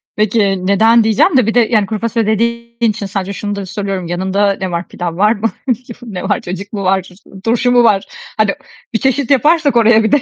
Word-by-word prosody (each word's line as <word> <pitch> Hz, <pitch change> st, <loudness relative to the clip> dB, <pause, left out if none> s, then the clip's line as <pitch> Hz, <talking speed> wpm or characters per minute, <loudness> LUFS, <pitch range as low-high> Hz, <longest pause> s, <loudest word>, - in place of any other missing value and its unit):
Peki 200 Hz, -3 st, +1 dB
neden 225 Hz, +4 st, +4 dB
diyeceğim 225 Hz, -, +3 dB
de; 255 Hz, -, +4 dB
bir 225 Hz, -, +1 dB
de 245 Hz, -, +4 dB
yani 220 Hz, -3 st, +2 dB
kuru 210 Hz, +1 st, -4 dB
fasulye 230 Hz, -1 st, -1 dB
dediğin 235 Hz, +2 st, -1 dB
için 205 Hz, 0 st, -6 dB
sadece 195 Hz, 0 st, -4 dB
şunu 205 Hz, +1 st, -4 dB
da 200 Hz, -1 st, -5 dB
soruyorum 195 Hz, -2 st, -4 dB
yanında 190 Hz, +3 st, 0 dB
ne 190 Hz, -1 st, -2 dB
var? 170 Hz, +1 st, -3 dB
Pilav 170 Hz, -1 st, -5 dB
var 210 Hz, +3 st, +4 dB
mı? 225 Hz, 0 st, -2 dB, 0.5 s
Ne 195 Hz, -7 st, -6 dB
var? -, -, -1 dB
Cacık 190 Hz, +4 st, -7 dB
mı 200 Hz, -2 st, -3 dB
var? 190 Hz, 0 st, 0 dB, 0.3 s
Turşu 235 Hz, +2 st, +1 dB
mu 245 Hz, -1 st, +5 dB
var? 200 Hz, -4 st, +3 dB, 0.3 s
Hani 215 Hz, -2 st, +1 dB, 0.4 s
bir 225 Hz, -, +1 dB
çeşit 265 Hz, +1 st, 0 dB
yaparsak 295 Hz, +1 st, +3 dB
oraya 225 Hz, -1 st, +5 dB
bir 220 Hz, -, 0 dB
de. 290 Hz, -1 st, +4 dB
215 Hz, 210 wpm, -15 LUFS, 195-235 Hz, 0.5 s, mu